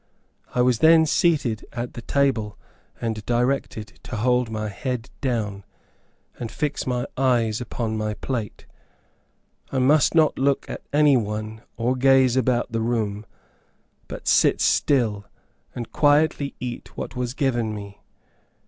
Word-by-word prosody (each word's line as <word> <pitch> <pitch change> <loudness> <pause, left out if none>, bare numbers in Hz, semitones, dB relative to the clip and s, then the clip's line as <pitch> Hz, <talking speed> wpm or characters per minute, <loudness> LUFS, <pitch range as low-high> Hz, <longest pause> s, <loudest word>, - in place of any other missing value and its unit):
I 125 - +3
was 125 -3 +2
then 160 0 +6
seated 145 -9 +1
at 120 0 -4
the 120 - -7
table, 115 -6 0 0.4
and 110 -2 -3
directed 120 -2 -1
to - - -7
hold 125 +2 +1
my 110 -1 -3
head 125 +3 -4
down, 105 -7 -2 0.8
and 115 -2 -5
fix 150 -3 -3
my 125 -1 -1
eyes 120 -4 +1
upon 115 -2 -3
my 105 0 -2
plate. 115 -5 -5 1.1
I 135 - -2
must 140 +5 +4
not 155 -2 +3
look 140 0 +1
at - - -6
any 145 -2 +5
one, 110 0 -4 0.2
or 120 +2 0
gaze 130 -1 +4
about 125 -2 +1
the 115 0 -1
room; 110 -3 -2 0.8
but - - -8
sit - - +4
still, 110 -8 +2 0.5
and 120 -2 -6
quietly 145 -1 +2
eat 125 -1 -7
what - - -5
was 125 0 -3
given 120 -6 0
me. 100 -1 -9
120 Hz, 140 wpm, -23 LUFS, 110-135 Hz, 1.1 s, then